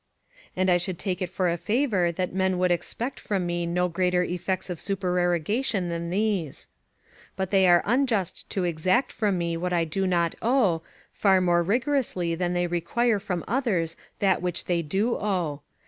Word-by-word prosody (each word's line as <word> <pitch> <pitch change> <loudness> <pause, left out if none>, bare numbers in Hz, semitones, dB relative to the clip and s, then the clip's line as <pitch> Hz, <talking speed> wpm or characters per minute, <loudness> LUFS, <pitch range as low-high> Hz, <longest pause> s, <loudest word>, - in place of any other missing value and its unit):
And 185 0 +1
I 175 - +5
should 175 0 -3
take 185 -1 -3
it 180 - -1
for 185 0 0
a 170 0 0
favour 210 - +1
that 180 +2 -3
men 190 -1 +1
would 180 0 +2
expect 225 +9 -2
from 195 -4 -2
me 175 0 -1
no 180 +1 +1
greater 180 +1 +1
effects 180 +1 -2
of 170 - -5
supererogation 180 - 0
than 170 0 -3
these. 195 -6 -1 0.7
But 190 -1 -3
they 190 -2 +5
are 175 -1 +5
unjust 230 -5 0
to 190 - -1
exact 180 - +1
from 205 -4 0
me 170 -1 -1
what 180 +1 -2
I 170 -1 +2
do 190 +4 -1
not 170 -2 +1
owe, 220 -9 +2 0.3
far 195 -2 +4
more 175 -1 +3
rigorously 215 - 0
than 175 +1 -1
they 175 0 +1
require 210 +6 +1
from 185 -4 -4
others 200 -10 0 0.2
that 190 -3 +2
which 180 -1 -2
they 175 -1 +1
do 195 +9 0
owe. 175 -8 -2
180 Hz, 180 wpm, -26 LUFS, 175-200 Hz, 0.7 s, I